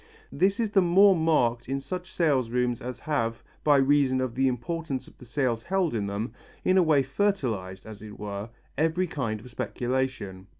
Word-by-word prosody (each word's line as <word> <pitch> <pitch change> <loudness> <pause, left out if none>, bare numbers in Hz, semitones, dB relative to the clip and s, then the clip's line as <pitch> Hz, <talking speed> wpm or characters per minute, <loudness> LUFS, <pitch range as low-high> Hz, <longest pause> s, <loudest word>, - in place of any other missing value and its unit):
This 190 +8 +1
is 225 -3 0
the 195 - +5
more 190 +3 +6
marked 125 -8 +1
in 135 0 -1
such 180 +6 -6
sale 150 -6 +2
rooms 120 0 -1
as 125 0 -6
have, 115 -7 -1 0.2
by 145 -2 +5
reason 135 -1 +3
of 130 -2 -1
the 135 +2 +2
importance 130 +2 -3
of - - -16
the 125 - -12
sales 125 -2 0
held 185 +1 0
in 105 -3 -1
them, 105 +3 -3 0.3
in 185 - +4
a - - +6
way 155 -5 +4
fertilized, 125 - -1
as 110 -2 -10
it 105 -1 -10
were, 100 +1 -5 0.3
every 165 +4 +2
kind 120 -10 -3
of 125 +2 -13
speculation. 120 -7 -3
130 Hz, 185 wpm, -27 LUFS, 115-160 Hz, 0.3 s, more